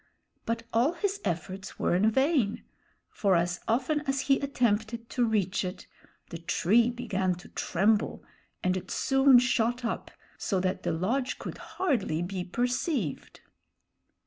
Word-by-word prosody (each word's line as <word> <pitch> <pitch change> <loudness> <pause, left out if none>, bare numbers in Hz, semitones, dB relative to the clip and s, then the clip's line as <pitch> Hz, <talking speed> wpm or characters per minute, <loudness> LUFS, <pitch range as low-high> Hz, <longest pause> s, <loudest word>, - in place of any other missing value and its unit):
But 230 0 -1
all 245 +8 +3
his 395 +3 -2
efforts 185 +1 -4
were - - +1
in 205 +5 +4
vain; 265 -3 +1 0.5
for 195 -4 +2
as 175 +1 0
often 260 +6 +1
as 270 0 +1
he 275 -1 +3
attempted 230 -4 -1
to 245 - +1
reach 205 -5 +1
it, 180 0 -5 0.5
the 165 - -5
tree 215 +8 +3
began 200 -7 -1
to 180 - -13
tremble, 205 +4 +1 0.4
and 185 0 +2
it 185 0 -5
soon 270 -1 +5
shot 240 0 +1
up 230 - -3 0.3
so 195 - 0
that 185 0 -1
the - - -1
lodge 235 +11 -1
could - - -7 0.2
hardly 230 - 0
be 180 0 -3
perceived. 245 - -2
225 Hz, 145 wpm, -28 LUFS, 185-255 Hz, 0.5 s, soon